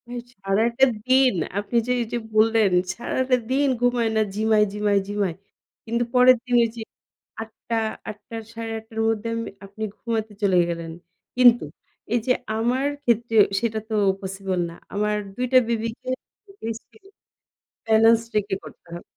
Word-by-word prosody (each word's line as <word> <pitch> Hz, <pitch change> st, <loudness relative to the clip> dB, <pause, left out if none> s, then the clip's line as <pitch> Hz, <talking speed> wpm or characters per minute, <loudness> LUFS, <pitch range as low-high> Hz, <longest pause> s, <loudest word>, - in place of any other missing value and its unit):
ইশ! 240 Hz, 0 st, -6 dB, 0.2 s
সারাটা 230 Hz, +6 st, +3 dB, 0.2 s
দিন 260 Hz, -1 st, +5 dB, 0.3 s
আপনি 205 Hz, +4 st, -6 dB
যে 250 Hz, -, 0 dB
এই 235 Hz, -, -1 dB
যে -, -, +1 dB, 0.2 s
বললেন 220 Hz, -2 st, +4 dB, 0.2 s
সারাটা 255 Hz, +3 st, 0 dB, 0.2 s
দিন 280 Hz, +2 st, +2 dB
ঘুমায় 245 Hz, -2 st, +2 dB
না, 220 Hz, -, +3 dB
ঝিমায়, 215 Hz, 0 st, +3 dB
ঝিমায়, 205 Hz, -1 st, +2 dB
ঝিমায়। 200 Hz, -4 st, -1 dB, 0.5 s
কিন্তু 235 Hz, +1 st, 0 dB
পরের 250 Hz, 0 st, +7 dB
দিন 245 Hz, -1 st, 0 dB
এই -, -, -3 dB
যে -, -, -5 dB, 0.6 s
৮ঃ০০, 225 Hz, +1 st, -5 dB, 0.3 s
৮ঃ০০ 215 Hz, +2 st, -9 dB
র -, -, -13 dB
৮ঃ৩০ 225 Hz, -1 st, -6 dB
র -, -, 0 dB
মধ্যে 225 Hz, 0 st, -2 dB
আমি, 230 Hz, -, -4 dB, 0.2 s
আপনি 200 Hz, +2 st, -8 dB
ঘুমাতে 220 Hz, -2 st, -3 dB
চলে 190 Hz, -3 st, +3 dB
গেলেন। 165 Hz, -1 st, -4 dB, 0.5 s
কিন্তু, 240 Hz, -4 st, +6 dB, 0.5 s
এই 240 Hz, -, +3 dB
যে 250 Hz, -, +5 dB, 0.2 s
আমার 245 Hz, +5 st, 0 dB, 0.2 s
ক্ষেত্রে 235 Hz, -2 st, +1 dB, 0.2 s
সেটা 220 Hz, -1 st, -1 dB
তো 220 Hz, -, -1 dB, 0.3 s
possible 190 Hz, -1 st, -3 dB
না। 170 Hz, -, -11 dB, 0.2 s
আমার 210 Hz, +1 st, 0 dB, 0.2 s
২ 250 Hz, -, -1 dB
টা -, -, +8 dB
বেবিকে 230 Hz, +2 st, -3 dB, 0.5 s
breast 225 Hz, 0 st, -5 dB
feeding 385 Hz, -, -21 dB, 0.7 s
balance 225 Hz, +1 st, +5 dB
রেখে 205 Hz, -2 st, 0 dB
করতে -, -, -14 dB
হয়। 175 Hz, -, -8 dB
225 Hz, 155 wpm, -23 LUFS, 210-240 Hz, 0.7 s, টা